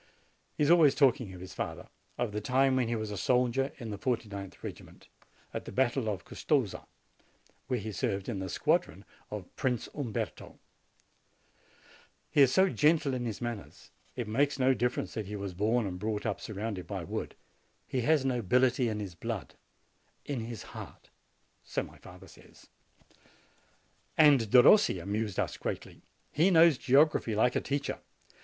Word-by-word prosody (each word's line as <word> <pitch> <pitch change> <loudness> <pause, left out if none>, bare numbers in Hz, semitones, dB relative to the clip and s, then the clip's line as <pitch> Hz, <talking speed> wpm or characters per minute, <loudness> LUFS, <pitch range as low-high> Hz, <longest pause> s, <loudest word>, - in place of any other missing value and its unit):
He - - 0
is 145 - +4
always 160 -5 +6
talking 125 -7 +3
of 90 -1 -10
his 95 - -9
father, - - -5 0.3
of 120 -3 -1
the 105 +1 -3
time 130 +4 +2
when 130 -3 +1
he 120 - -1
was 110 -1 -4
a 105 - -4
soldier 125 +6 +1
in 115 -5 -6
the 100 - -6
49th 105 -6 -4
regiment, - - -10 0.4
at - - -5
the - - -7
battle 130 -2 +1
of 95 -4 -4
Custoza, 130 -10 -1 0.8
where 130 -2 0
he 110 +1 -5
served 100 -2 -2
in 105 -5 -3
the 95 0 -4
squadron - - 0 0.2
of 105 -4 -8
Prince 125 -4 -1
Umberto. 125 -8 -4
And - - -27 1.7
he 145 - +4
is 135 -2 +6
so 190 +7 +5
gentle 150 -5 +2
in 125 -1 -2
his 110 -4 -4
manners! 120 -4 -6 0.2
It 120 -3 -4
makes 140 +7 +1
no 130 0 +4
difference 125 +1 -1
that 110 -3 -4
he 105 - -5
was 100 -2 -5
born 110 +5 +1
and 90 -2 -5
brought 105 0 -3
up - - -2
surrounded 100 -4 -5
by - - -4
wood: - - -5 0.5
he 130 - -2
has 145 +1 +2
nobility 125 +1 +2
in 105 -1 -3
his 100 -4 -5
blood, 85 - -5 0.7
in 140 -4 -3
his 115 -2 -6
heart, - - -10 0.5
so - - -2
my - - -13
father - - -13
says. - - -18 1.5
And 140 -8 +6
Derossi 125 - +6
amused 105 +2 -3
us - - -1
greatly. - - -5 0.3
He 165 +6 +3
knows 165 -5 +6
geog 145 +4 +5
raphy 110 -6 -2
like 120 +3 +2
a - - +1
teacher. 140 0 -3
120 Hz, 170 wpm, -30 LUFS, 105-135 Hz, 1.7 s, always